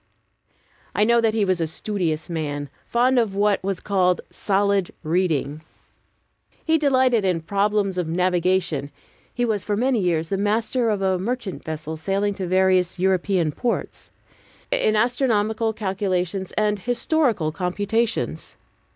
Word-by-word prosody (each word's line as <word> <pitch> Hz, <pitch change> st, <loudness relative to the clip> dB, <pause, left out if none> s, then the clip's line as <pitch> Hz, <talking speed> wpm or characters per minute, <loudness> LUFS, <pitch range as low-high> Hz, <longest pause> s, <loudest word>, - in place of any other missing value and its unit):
I 210 Hz, -, +3 dB
know 235 Hz, +2 st, +4 dB
that 225 Hz, -1 st, +1 dB
he 215 Hz, -2 st, +2 dB
was 185 Hz, -2 st, 0 dB
a 165 Hz, -, 0 dB
studious 165 Hz, -2 st, -3 dB
man, 145 Hz, -4 st, -4 dB, 0.2 s
fond 250 Hz, +2 st, +3 dB
of 215 Hz, -5 st, 0 dB
what 205 Hz, -1 st, +2 dB
was 195 Hz, -2 st, -2 dB
called 180 Hz, -3 st, +1 dB
"solid 200 Hz, -2 st, +1 dB
reading." 155 Hz, -3 st, 0 dB, 1.0 s
He 320 Hz, 0 st, +3 dB
delighted 260 Hz, -6 st, +3 dB
in 180 Hz, -3 st, +1 dB
problems 200 Hz, +1 st, 0 dB
of 175 Hz, -, -1 dB
navigation 175 Hz, -3 st, 0 dB, 0.4 s
(he 245 Hz, -, -1 dB
was 215 Hz, -4 st, -1 dB
for 205 Hz, -1 st, -1 dB
many 250 Hz, +1 st, +2 dB
years 165 Hz, -4 st, 0 dB
the 195 Hz, -, 0 dB
master 225 Hz, +4 st, +1 dB
of 205 Hz, -2 st, -1 dB
a 190 Hz, -1 st, +1 dB
merchant 230 Hz, 0 st, -4 dB
vessel 155 Hz, 0 st, -5 dB
sailing 195 Hz, +5 st, 0 dB
to 190 Hz, -2 st, -4 dB
various 185 Hz, 0 st, +2 dB
European 185 Hz, -2 st, +1 dB
ports), 235 Hz, -, -3 dB, 0.6 s
in 360 Hz, -, +2 dB
astronomical 225 Hz, -2 st, +1 dB
calculations 190 Hz, -3 st, -2 dB
and 210 Hz, -1 st, +1 dB
historical 240 Hz, -, 0 dB
computations. 205 Hz, +7 st, -2 dB
195 Hz, 135 wpm, -23 LUFS, 180-220 Hz, 1.0 s, know